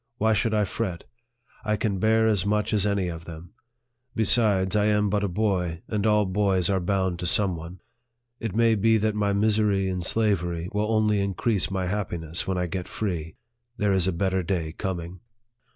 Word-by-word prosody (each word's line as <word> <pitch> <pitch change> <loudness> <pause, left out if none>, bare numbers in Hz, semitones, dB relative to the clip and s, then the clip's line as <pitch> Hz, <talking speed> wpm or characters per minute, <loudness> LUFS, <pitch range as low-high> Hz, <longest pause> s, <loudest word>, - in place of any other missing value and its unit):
Why 110 +1 +2
should 110 +1 +1
I 105 - +3
fret? 95 -4 -3 0.6
I 105 0 0
can 105 -2 -1
bear 110 +2 +3
as 105 -5 +2
much 105 +2 0
as 105 -1 +2
any 100 -3 0
of 80 -1 -6
them. 85 +1 -10 0.6
Besides, 105 -3 +3
I 105 0 +3
am 105 -1 +2
but 105 0 +1
a - - +1
boy, 90 -3 -1
and 105 0 -1
all 105 -1 +3
boys 95 -2 +1
are 95 - +1
bound 95 -1 -1
to 90 - -2
some 95 0 +2
one. 85 +2 -9 0.6
It 115 -5 -4
may 115 0 +4
be 110 +1 +3
that 110 0 0
my 105 -1 0
misery 105 -1 +2
in 90 -1 -2
slavery 90 -4 0
will 105 +2 0
only 105 -1 +2
increase 100 +2 0
my 95 -1 -2
happiness 85 -4 -3
when 95 -1 -1
I 90 - 0
get 90 +1 -4
free. 85 -7 -4 0.4
There 105 -2 +1
is 95 -1 +1
a - - +2
better 95 +2 0
day 85 -3 -2
coming." 90 0 -5
100 Hz, 190 wpm, -25 LUFS, 90-105 Hz, 0.6 s, may